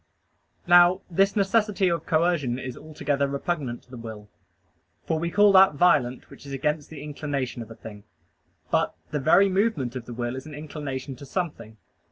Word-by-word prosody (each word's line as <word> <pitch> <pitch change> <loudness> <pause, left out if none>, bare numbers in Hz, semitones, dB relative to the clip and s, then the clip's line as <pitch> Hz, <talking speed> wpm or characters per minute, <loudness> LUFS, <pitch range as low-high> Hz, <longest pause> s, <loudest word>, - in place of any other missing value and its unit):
Now 175 +1 +6
this 195 +3 +2
necessity 205 -1 +2
of 170 -1 -1
coercion 155 -6 +1
is 130 -1 -6
altogether 145 -2 -2
repugnant 140 -3 -3
to 125 - -24
the 125 - -8
will. 110 -3 -9 0.8
For 160 -1 -1
we 170 +1 -2
call 205 +4 +5
that 190 -5 +6
violent 140 -7 +2
which 140 - -13
is 140 -1 -8
against 150 +2 -2
the 160 - -9
inclination 140 -5 -4
of 115 - -9
a 115 - -10
thing. 105 -2 -11 0.7
But - - +1 0.2
the 150 - -1
very 160 +8 +5
movement 190 - 0
of 125 -2 -6
the 120 - -7
will 120 +1 -3
is 130 +4 -8
an 150 - -9
inclination 140 -3 -6
to 140 - -10
something. 145 - -4
150 Hz, 180 wpm, -25 LUFS, 130-175 Hz, 0.8 s, Now